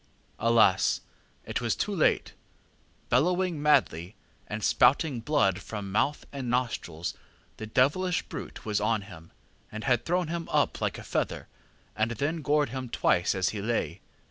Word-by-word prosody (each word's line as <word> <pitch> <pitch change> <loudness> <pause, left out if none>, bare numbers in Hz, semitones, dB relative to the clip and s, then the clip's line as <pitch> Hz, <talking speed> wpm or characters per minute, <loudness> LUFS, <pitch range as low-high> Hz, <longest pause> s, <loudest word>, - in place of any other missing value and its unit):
ŌĆ£Alas! 115 -5 +4 0.4
it - - -2
was - - 0
too - - -2
late. - - +2 0.8
Bellowing 175 +3 +2
madly, 95 - +2 0.3
and 105 0 -5
spouting 140 -2 +3
blood 110 - +1
from 100 -2 -6
mouth 140 +8 0
and 135 -3 -4
nostrils, 115 -9 -2 0.4
the 110 - -6
devilish 160 +11 +2
brute - - -8
was 105 -2 0
on 110 -1 +1
him, 85 -5 -12 0.4
and 110 0 -6
had 120 +1 +2
thrown 175 0 0
him 170 0 -4
up - - +1
like - - -1
a - - -8
feather, - - -2 0.5
and 110 +1 +1
then 155 +8 -2
gored 145 -1 +2
him 130 0 -5
twice 90 -3 +2
as 95 -1 +1
he 105 - -4
lay. 100 -6 -2
115 Hz, 150 wpm, -28 LUFS, 100-150 Hz, 0.8 s, ŌĆ£Alas